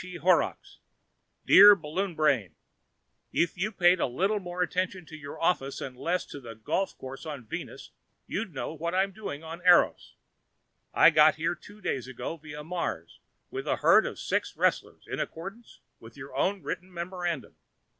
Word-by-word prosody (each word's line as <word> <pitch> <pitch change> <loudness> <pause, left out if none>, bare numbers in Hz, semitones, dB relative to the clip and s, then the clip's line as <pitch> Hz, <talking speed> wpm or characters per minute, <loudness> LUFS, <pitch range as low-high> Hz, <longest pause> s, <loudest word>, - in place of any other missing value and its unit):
E. 180 0 -9
Horrocks 175 -1 +1 0.7
Dear 205 +1 +10
Balloon 175 +2 -3
Brain: 130 - +1 0.8
If 170 - +1
you 195 +4 -2
paid 180 -2 +4
a - - +1
little 195 - 0
more 180 -1 -2
attention 185 0 -2
to 155 - -11
your 145 -2 -9
office 140 -5 0
and 130 - -6
less 170 +8 -1
to 145 - -9
that 115 -4 -11
golf 195 - -1
course 130 +1 -8
on 145 -6 -7
Venus, - - -7 0.3
you'd 210 0 -4
know 145 +1 -5
what 170 +3 -3
I 190 - +4
am 195 - -4
doing 180 -7 -7
on 165 +2 -8
Eros. 180 -1 +4 0.8
I - - +6
got 155 0 +6
here 155 +1 -1
two 205 +4 -15
days 130 -9 -2
ago 130 +5 -5
via 150 -1 -9
Mars 175 +2 -4 0.3
with 390 0 -5
a - - +2
herd - - +5
of - - -6
six - - -2
wrestlers, - - 0
in - - -4
accordance 195 +8 -7 0.2
with 115 +3 -14
your 135 0 -10
own 195 0 0
written 185 +2 -5
memorandum. 175 -3 -4
170 Hz, 175 wpm, -28 LUFS, 145-185 Hz, 0.8 s, Dear